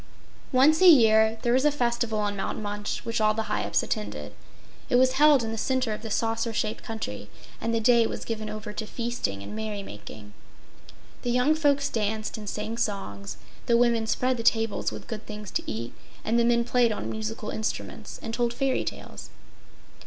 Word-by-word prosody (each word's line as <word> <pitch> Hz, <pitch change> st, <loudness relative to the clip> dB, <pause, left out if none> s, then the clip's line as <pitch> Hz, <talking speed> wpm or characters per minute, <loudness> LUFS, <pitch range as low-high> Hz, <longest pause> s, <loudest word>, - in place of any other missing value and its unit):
Once 285 Hz, +6 st, +5 dB
a 375 Hz, -, +8 dB
year 220 Hz, -6 st, +6 dB
there 240 Hz, -, +2 dB
was 260 Hz, +1 st, +3 dB
a 300 Hz, -, +5 dB
festival 235 Hz, -5 st, 0 dB
on 205 Hz, -1 st, -1 dB
Mount 195 Hz, -, -3 dB
Munch 205 Hz, +1 st, -4 dB
which 230 Hz, -1 st, -1 dB
all 215 Hz, 0 st, +3 dB
the 220 Hz, -, -1 dB
Hyups -, -, 0 dB
attended. 105 Hz, -9 st, -4 dB, 0.6 s
It -, -, +3 dB
was 255 Hz, +1 st, +5 dB
held 285 Hz, -1 st, +5 dB
in 225 Hz, -, -3 dB
the 225 Hz, -, -3 dB
center 260 Hz, -3 st, 0 dB
of 210 Hz, -, -6 dB
the 225 Hz, -, -6 dB
saucer 225 Hz, +1 st, 0 dB
shaped 215 Hz, 0 st, -2 dB
country, 105 Hz, -, -5 dB, 0.3 s
and 230 Hz, -, -1 dB
the 230 Hz, -, +1 dB
day 235 Hz, 0 st, +4 dB
was -, -, -6 dB
given 220 Hz, -2 st, -4 dB
over 210 Hz, 0 st, -6 dB
to 215 Hz, 0 st, -5 dB
feasting 230 Hz, -, -3 dB
and 155 Hz, -, -7 dB
merry 215 Hz, -2 st, -4 dB
making. 105 Hz, -, -10 dB, 0.9 s
The 245 Hz, -, -3 dB
young 250 Hz, +5 st, +3 dB
folks 285 Hz, -3 st, +2 dB
danced 215 Hz, 0 st, -2 dB
and 210 Hz, -2 st, -6 dB
sang 215 Hz, +3 st, -4 dB
songs; 105 Hz, -, -3 dB, 0.3 s
the 235 Hz, -, +5 dB
women 235 Hz, -2 st, +2 dB
spread 255 Hz, +3 st, +1 dB
the -, -, -3 dB
tables 225 Hz, -1 st, +1 dB
with -, -, -8 dB
good 220 Hz, -2 st, -7 dB
things 210 Hz, -2 st, -7 dB
to -, -, -2 dB
eat, 115 Hz, +2 st, -5 dB, 0.3 s
and 230 Hz, +2 st, +2 dB
the 235 Hz, -, +3 dB
men 235 Hz, 0 st, +3 dB
played 245 Hz, -1 st, +3 dB
on 215 Hz, -, -3 dB
musical 220 Hz, 0 st, -4 dB
instruments 220 Hz, -, -4 dB
and 225 Hz, -, -4 dB
told 235 Hz, 0 st, 0 dB
fairy 270 Hz, 0 st, +1 dB
tales. -, -, -7 dB
225 Hz, 195 wpm, -26 LUFS, 210-240 Hz, 0.9 s, a